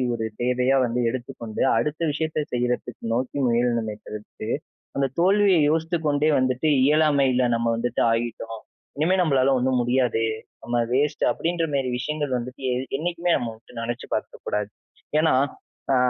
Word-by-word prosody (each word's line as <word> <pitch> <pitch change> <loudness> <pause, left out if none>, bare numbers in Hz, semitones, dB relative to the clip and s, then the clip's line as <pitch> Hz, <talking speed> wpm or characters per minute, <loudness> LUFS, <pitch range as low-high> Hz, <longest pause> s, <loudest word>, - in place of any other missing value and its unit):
ஒரு 110 -1 -2 0.2
தேவையா 125 +2 +2
வந்து 120 +1 -1
எடுத்துக்கொண்டு, 120 -3 -6 0.2
அடுத்த 150 +8 -1
விஷயத்த 155 -1 -2
செய்றதுக்கு 120 -1 -2
நோக்கி 130 +3 -2
முயலனுமே 115 -2 +1
தவிர்த்து, 105 +1 -7 0.5
அந்த 140 0 +2
தோல்விய 195 0 +4
யோசித்துக் 160 0 0
கொண்டே 150 +1 +2
வந்துட்டு 130 +4 +1 0.2
இயலாமைல 140 -4 +3
நம்ம 115 0 0
வந்துட்டு 120 +1 -1
ஆகிட்டோம். 115 -1 -3 0.4
"இனிமே 165 +6 +2
நம்பளால 135 -6 +3
ஒண்ணும் 130 0 +1
முடியாது. 120 -2 +1 0.4
நம்ம 120 +1 -1
வேஸ்ட்" 140 +4 +1
அப்டீன்ற 170 0 -1
மேரி 135 -2 0
விஷயங்கள் 145 +2 -3
வந்துட்டு, 125 +3 -7
எ - - 0 0.2
என்னைக்குமே 175 +2 -1
நம்ம 120 -3 -3
வந்துட்டு 110 +2 -18
நினைச்சு 120 +1 -4
பார்க்கக்கூடாது. 105 -1 -3 0.5
ஏன்னா. 160 -2 +3 0.6
ஆ - - +4
130 Hz, 140 wpm, -24 LUFS, 120-150 Hz, 0.6 s, தோல்விய